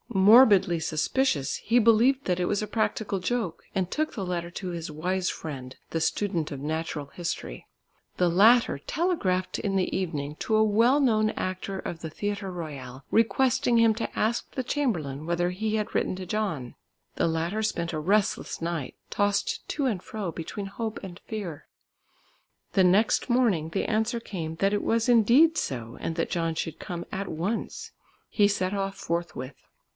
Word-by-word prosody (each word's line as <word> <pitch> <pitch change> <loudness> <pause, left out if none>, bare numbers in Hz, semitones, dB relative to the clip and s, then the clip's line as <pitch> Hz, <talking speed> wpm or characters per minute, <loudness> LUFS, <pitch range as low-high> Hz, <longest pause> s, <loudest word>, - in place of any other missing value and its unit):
Morbidly 195 -3 +6
suspicious 160 - 0
he 230 +3 +1
believed 235 +4 +4
that 180 -1 0
it 180 - +1
was 200 - 0
a - - -3
practical 215 -3 -1
joke, 215 -3 -2
and 185 -2 0
took 310 +7 -1
the 195 - -4
letter 170 -1 -3
to 185 +1 -5
his 170 -2 -5
wise 180 +4 -1
friend 130 -4 -6
the 165 - -1
student 170 -4 0
of 140 - -5
Natural 155 0 -3
History. 170 - -5 0.5
The 180 - +3
latter 205 - +5
telegraphed 195 - -1
in 195 -2 -1
the 190 -1 0
evening 150 -6 -3
to 220 - 0
a 215 - +5
well 230 +6 +4
known 215 -6 +3
actor 185 +1 -4
of 170 -2 -6
the 160 - -5
Theatre 205 +3 -3
Royal 135 -7 -7
requesting 235 +1 +3
him 230 -1 +5
to 230 - -4
ask 225 +2 0
the 260 - -1
chamberlain 165 - -2
whether 175 +1 +1
he 215 +4 -2
had 215 0 -2
written - - +1
to 185 - -6
John. 180 - -3 0.4
The - - +1
latter 165 +6 -1
spent 170 -6 -1
a 155 - -1
restless 200 +6 0
night, 165 -5 -3
tossed 205 -1 0
to 285 - -1
and 210 -8 -1
fro 205 -5 -4
between 170 +5 -6
hope 220 +3 -5
and 185 -1 -8
fear. 195 -9 -6 1.1
The 190 - +4
next 200 +8 +3
morning 225 -11 +2
the 195 - -1
answer 220 +2 0
came 165 -8 -5
that 195 +3 +2
it 205 - 0
was 230 +1 +1
indeed 250 +8 +5
so 120 -3 -3
and 165 - -3
that 165 - -2
John 165 -2 -1
should 160 0 -4
come 175 -1 -5
at 195 0 -3
once. 180 +8 -3 0.4
He 205 -2 +4
set 190 -2 -1
off 195 -1 -2
forthwith. 170 -6 -4
190 Hz, 170 wpm, -27 LUFS, 165-220 Hz, 1.1 s, Morbidly